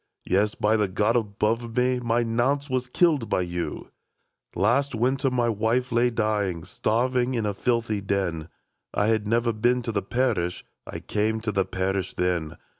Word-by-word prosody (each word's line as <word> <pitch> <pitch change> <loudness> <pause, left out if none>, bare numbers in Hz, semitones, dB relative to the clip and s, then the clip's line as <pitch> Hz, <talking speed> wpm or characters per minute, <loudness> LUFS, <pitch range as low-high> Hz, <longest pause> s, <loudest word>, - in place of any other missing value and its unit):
Yes, 100 +3 +1
by 110 +1 +2
the 105 -2 +1
God 105 +5 +1
above 115 +2 -1
us, 125 0 +2
My 120 0 +1
Nance 130 +5 0
was 130 -1 0
killed 145 -3 +2
by - - +1
you! 85 -1 -4 0.3
*' - - -48 0.3
Last 125 +6 +2
winter 130 +4 +1
my 125 -2 +1
wife 115 +3 0
lay 120 +1 +3
dying. 105 -7 -1
Starved 120 +8 -1
in 120 -2 0
a 105 - 0
filthy 115 -1 0
den; 95 -5 -2 0.5
I 105 - +2
had 110 -2 +1
never 115 +1 +1
been 120 +3 +1
to 115 - -2
the 100 -2 -1
parish, 100 -5 -1
— - - -52
I - - -6
came 110 +1 -1
to 110 -1 -2
the 95 -2 +1
parish 95 0 -2
then. 90 -3 -1
115 Hz, 180 wpm, -25 LUFS, 100-125 Hz, 0.5 s, lay